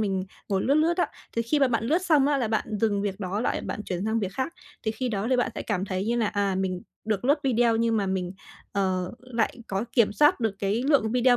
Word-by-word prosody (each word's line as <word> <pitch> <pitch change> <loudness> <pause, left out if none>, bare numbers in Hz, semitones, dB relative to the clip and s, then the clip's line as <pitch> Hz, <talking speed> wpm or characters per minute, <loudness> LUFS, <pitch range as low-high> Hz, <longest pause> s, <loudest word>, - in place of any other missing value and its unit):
mình 195 -3 0 0.2
ngồi 195 -1 +1
lướt 275 - +3
lướt 325 +3 +3
á. 355 - +2 0.3
Thì 230 - +2
khi 290 +6 +1
mà 270 -2 +4
bạn 230 -2 0
lướt 310 +8 +3
xong 310 -7 +4
á 290 -1 +3
là 240 -5 0
bạn 220 - 0
dừng 205 -3 +1
việc 205 0 -3
đó 190 +2 -2
lại, - - 0
bạn 210 - -5
chuyển 180 +2 -3
sang 220 +1 +1
việc 195 -2 -2
khác. 260 +8 -2 0.3
Thì 220 - 0
khi 250 +3 -3
đó 205 -1 -1
thì 255 - +4
bạn 245 - +1
sẽ - - -4
cảm 200 -3 -1
thấy 185 0 -2
như 235 - +1
là, 230 -2 +2
à, 200 -2 0
mình 185 -1 -2 0.2
được 215 +1 -1
lướt 285 +3 +4
video 235 -3 +3
nhưng 230 0 +2
mà 200 -2 +1
mình, 185 -1 -2 0.4
ờ, 185 -2 0
lại 245 -1 -2
có 195 +3 -2
kiểm 230 -5 +4
soát 295 +5 +4
được 220 -4 0
cái 205 +5 0
lượng 245 -7 +3
video 250 0 +4
220 Hz, 265 wpm, -26 LUFS, 195-250 Hz, 0.4 s, mà